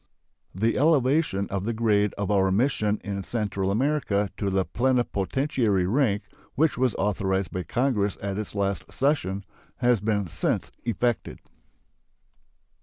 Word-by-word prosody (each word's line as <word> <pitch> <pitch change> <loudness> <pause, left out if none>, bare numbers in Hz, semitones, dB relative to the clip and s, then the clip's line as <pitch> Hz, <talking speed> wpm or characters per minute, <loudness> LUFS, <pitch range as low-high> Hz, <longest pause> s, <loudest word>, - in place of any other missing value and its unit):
The 110 +4 +1
elevation 140 -7 +3
of 95 -1 -2
the 115 +3 -1
grade 105 -3 +2
of 100 0 -1
our 95 -2 +3
mission 105 -1 +1
in 100 -1 -4
Central 100 -3 -2
America 110 -3 +1
to 100 - -1
the 95 -1 +1
plenipotentiary 120 -3 +1
rank, 105 -1 +1 0.3
which 155 +2 +2
was 125 -3 +1
authorized 95 -2 0
by 90 - -3
Congress 110 -3 0
at 100 -1 -3
its 110 - -5
late 100 -2 -1
session, 100 -9 0 0.3
has 120 -4 +2
been 105 -1 0
since 80 -3 -1
effected. 120 -1 -1
105 Hz, 130 wpm, -26 LUFS, 100-125 Hz, 0.3 s, elevation